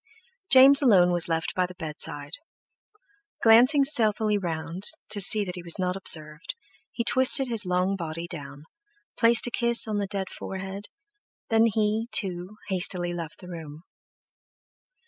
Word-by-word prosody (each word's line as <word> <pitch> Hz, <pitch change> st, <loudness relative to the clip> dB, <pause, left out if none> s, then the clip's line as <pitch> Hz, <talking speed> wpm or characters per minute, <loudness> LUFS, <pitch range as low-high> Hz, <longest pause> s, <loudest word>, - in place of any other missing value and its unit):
James 270 Hz, +2 st, +8 dB
alone 190 Hz, -9 st, +3 dB
was 175 Hz, -1 st, -1 dB
left 160 Hz, 0 st, -4 dB
by 185 Hz, -1 st, -2 dB
the 180 Hz, -, -15 dB
bedside; 150 Hz, -3 st, -4 dB, 1.1 s
glancing 250 Hz, +6 st, +4 dB
stealthily 220 Hz, -6 st, 0 dB
round, 170 Hz, 0 st, -6 dB, 0.2 s
to 205 Hz, -, +4 dB
see 210 Hz, +2 st, +5 dB
that 180 Hz, -, -8 dB
he 180 Hz, -, -9 dB
was 170 Hz, -1 st, -3 dB
not 180 Hz, 0 st, -3 dB
observed, 155 Hz, -4 st, -1 dB, 0.4 s
he 235 Hz, -, -5 dB
twisted 260 Hz, +2 st, +3 dB
his 225 Hz, -5 st, -1 dB
long 180 Hz, +2 st, -2 dB
body 165 Hz, -2 st, -8 dB
down, 145 Hz, -3 st, -11 dB, 0.5 s
placed 230 Hz, 0 st, +4 dB
a 245 Hz, -, -5 dB
kiss 235 Hz, -1 st, 0 dB
on 210 Hz, -1 st, -4 dB
the 200 Hz, -, -4 dB
dead 195 Hz, -1 st, -5 dB
forehead, 195 Hz, +1 st, -9 dB, 0.6 s
then 225 Hz, 0 st, +2 dB
he, 220 Hz, +1 st, -3 dB
too, 185 Hz, +1 st, -2 dB
hastily 180 Hz, -2 st, -1 dB
left 170 Hz, -1 st, -9 dB
the 180 Hz, -, -13 dB
room. 160 Hz, -3 st, -11 dB
190 Hz, 145 wpm, -23 LUFS, 170-225 Hz, 1.1 s, James